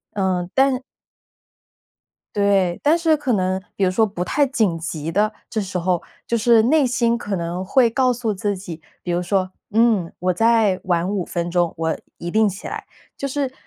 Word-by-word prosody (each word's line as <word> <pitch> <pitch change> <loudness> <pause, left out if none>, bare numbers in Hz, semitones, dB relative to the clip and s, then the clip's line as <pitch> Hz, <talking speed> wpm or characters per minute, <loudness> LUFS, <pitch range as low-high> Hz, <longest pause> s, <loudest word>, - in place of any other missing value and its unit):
呃， 185 -3 0
但 265 -1 +3 1.5
对， 195 -4 +2
但 305 +3 +4
是 325 -2 +3
可 275 -4 -1
能 185 0 0 0.2
比 195 - +1
如 185 - +3
说 220 +4 +3
不 180 -3 -4
太 285 +6 +2
紧 215 -10 0
急 165 -1 -4
的， 210 +3 +2 0.2
这 220 - -1
时 185 -2 -3
候， 175 0 0 0.2
就 235 - 0
是 230 0 +5
内 285 +3 +3
心 235 -1 +1
可 205 -4 -3
能 170 +2 -3
会 235 +4 +3
告 255 +1 +2
诉 230 -3 -2
自 200 +1 -2
己， 170 -4 -8 0.2
比 175 - -3
如 175 +1 0
说， 185 0 0 0.2
嗯， 220 -5 +3
我 180 +1 +1
再 225 -2 +3
晚 175 0 +1
5 195 -4 -1
分 170 -1 -3
钟， 175 -1 +1
我 160 0 -1 0.2
一 175 - -5
定 215 +1 +3
起 195 +1 -7
来， - - -6 0.3
就 275 - -2
是 270 -1 -2
200 Hz, 200 characters per minute, -21 LUFS, 180-235 Hz, 1.5 s, 是